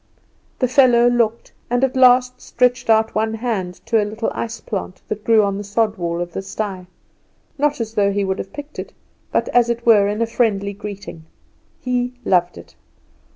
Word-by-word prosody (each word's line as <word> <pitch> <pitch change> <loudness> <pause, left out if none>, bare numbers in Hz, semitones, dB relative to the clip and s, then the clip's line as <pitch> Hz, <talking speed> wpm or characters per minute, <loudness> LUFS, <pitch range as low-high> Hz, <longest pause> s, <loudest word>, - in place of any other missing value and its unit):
The 255 - +1
fellow 245 -2 +5
looked, 235 -2 0 0.2
and 245 +2 +1
at 265 -1 +1
last 250 -1 +4
stretched 250 0 0
out 220 0 +3
one 220 +1 0
hand 215 -6 -3
to 225 -1 +2
a - - +1
little 215 +2 -3
ice 230 0 -4
plant 190 -3 -5
that 215 0 -4
grew 225 -1 +4
on 200 0 -1
the - - -5
sod 210 +1 0
wall 170 0 -2
of 175 -1 -5
the - - -3
sty; 195 -2 -5 0.7
not 295 -1 +1
as 225 -1 -4
though 200 -2 +2
he 200 0 0
would 190 0 -2
have - - -6
picked 295 0 -9
it, - - -7 0.4
but - - 0
as 240 -1 +3
it 235 0 -2
were 210 -4 +5
in 205 +1 -2
a 230 - +2
friendly 210 -4 0
greeting. 200 -5 -9 0.6
He 250 0 -1
loved 175 -2 +2
it. 85 - -13
220 Hz, 195 wpm, -20 LUFS, 200-245 Hz, 0.7 s, fellow